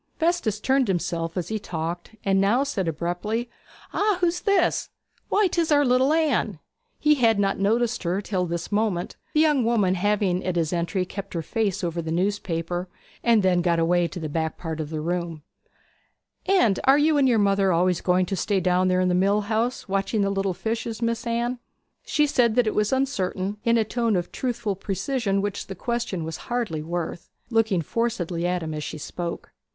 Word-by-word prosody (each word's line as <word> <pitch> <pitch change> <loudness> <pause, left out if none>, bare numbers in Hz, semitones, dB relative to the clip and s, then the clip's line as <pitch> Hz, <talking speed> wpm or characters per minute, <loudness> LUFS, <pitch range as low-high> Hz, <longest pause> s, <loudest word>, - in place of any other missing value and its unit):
Festus 320 - 0
turned 265 +2 +2
himself 170 -2 -2
as 175 -2 -2
he 220 0 -2
talked, 170 +3 -5
and 195 -1 +3
now 225 +7 +3
said 200 -11 -2
abruptly: 175 +9 -2 0.4
'Ah, 415 -2 +2
who's 350 -1 +1
this? 400 -4 +2 0.4
Why, 415 0 +3
'tis 340 -3 0
our 290 -1 +5
little 255 +2 +3
Anne!' 295 - +1 0.4
He 300 0 +4
had 230 -6 +3
not 195 -1 +1
noticed 230 +4 +1
her 180 +2 0
till 190 -3 -2
this 170 +2 -4
moment, 205 -4 0 0.2
the 305 - +5
young 300 -5 +3
woman 220 -5 +2
having 190 -1 +1
at 185 -1 -2
his 165 -1 0
entry 175 +2 -1
kept 200 +1 -7
her 165 - -2
face 200 0 -1
over 170 0 -1
the 160 -1 -4
newspaper, 175 -1 -1 0.3
and 230 -3 +4
then 180 -2 +3
got 170 -1 +2
away 170 +1 +2
to 180 - -7
the 160 - -3
back 160 +1 -2
part 160 -2 -5
of 155 -2 -3
the 155 -1 -3
room. 170 -2 -3 1.0
'And 240 - +3
are 270 +1 +6
you 300 0 +3
and 265 -2 +4
your 235 - +3
mother 195 -2 +3
always 180 +1 +2
going 180 0 +2
to 195 - -2
stay 195 +2 0
down 180 0 +2
there 185 0 +2
in 185 - +2
the 180 - +2
mill 200 +3 +3
house 225 +4 -1
watching 195 +2 0
the 200 0 +1
little 195 -2 -1
fishes, 225 +3 -3
Miss 230 +1 -1
Anne?' 235 +1 -1 0.4
She 300 - +2
said 245 -6 +2
that 245 -1 +4
it 215 - 0
was 210 0 +1
uncertain, 205 -7 -1
in 230 0 +3
a 225 - +3
tone 230 0 0
of 175 -1 -2
truthful 235 -5 -2
precision 200 +1 -1
which 205 -1 -3
the 195 - -6
question 235 -5 -2
was 160 0 -5
hardly 235 -11 -1
worth, 170 +1 -4 0.2
looking 220 -7 +2
forcedly 175 -5 -1
at 180 -1 -1
him 160 -1 -4
as 150 0 -4
she - - -5
spoke. 170 +3 -6
200 Hz, 195 wpm, -24 LUFS, 175-235 Hz, 1.0 s, are